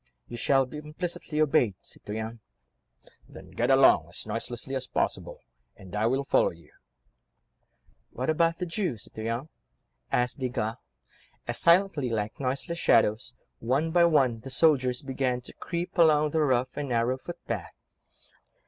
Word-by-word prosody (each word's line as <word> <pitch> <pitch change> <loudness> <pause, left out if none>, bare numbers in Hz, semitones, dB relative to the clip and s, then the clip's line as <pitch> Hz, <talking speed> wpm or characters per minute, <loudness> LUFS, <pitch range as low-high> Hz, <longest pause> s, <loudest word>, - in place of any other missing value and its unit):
"You 120 - -8
shall 135 +3 +2
be 150 +4 -8
implicitly 155 0 -4
obeyed, 130 -9 +3
citoyen." 110 +2 -7 0.9
"Then - - -13
get - - -1
along - - +5
as - - -3
noiselessly 120 +2 -4
as 130 -1 -2
possible, - - -2 0.4
and 95 +1 -10
I 105 +2 +2
will 135 +3 +1
follow - - +3
you." 85 -3 -15 1.4
"What 130 - -4
about 165 +1 +2
the 180 - -3
Jew, 175 - -2
citoyen?" 115 +7 -5 0.6
asked 125 +2 0
Desgas, 125 -3 -2 0.7
as - - +1
silently 170 -6 +3
like 105 -2 -3
noiseless 140 +5 -2
shadows, 115 0 +2 0.2
one 135 +8 0
by 170 0 +5
one 135 -8 +3
the 135 - -9
soldiers 130 -2 +3
began 130 -2 -1
to - - -11
creep 175 +1 -5
along 155 -2 +5
the 160 - +1
rough 130 -3 +1
and 145 -2 -4
narrow 120 +2 0
footpath. 115 - -6
130 Hz, 140 wpm, -27 LUFS, 115-155 Hz, 1.4 s, along